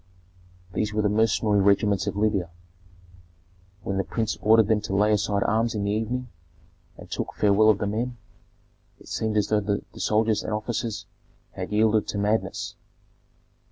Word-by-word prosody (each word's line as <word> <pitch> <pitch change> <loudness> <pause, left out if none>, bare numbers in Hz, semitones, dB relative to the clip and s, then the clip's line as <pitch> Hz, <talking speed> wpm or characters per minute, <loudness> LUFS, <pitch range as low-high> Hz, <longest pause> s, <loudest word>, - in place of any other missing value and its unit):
These 105 +2 -2
were 105 - +1
the 105 - +2
mercenary 105 -1 +2
regiments 100 0 +2
of - - -2
Libya. 100 -4 0 1.3
When 100 - -2
the 95 - +1
prince 110 +1 -2
ordered 110 -1 +5
them 110 -1 +2
to 100 -2 -3
lay 105 +2 +3
aside 100 -1 +1
arms 115 +1 +1
in 105 - -1
the 100 - 0
evening, 115 +4 -2 0.7
and - - -11
took - - -3
farewell 105 +1 +4
of 105 - +4
the 105 - -2
men, 120 +4 -2 0.8
it - - -17
seemed 110 -1 -1
as 105 - +1
though 105 - +3
the 100 0 -2 0.2
soldiers 110 0 +1
and 110 - -4
officers 110 0 -3 0.5
had - - -6
yielded 110 0 +2
to - - -3
madness. 105 +2 -1
105 Hz, 160 wpm, -25 LUFS, 100-110 Hz, 1.3 s, ordered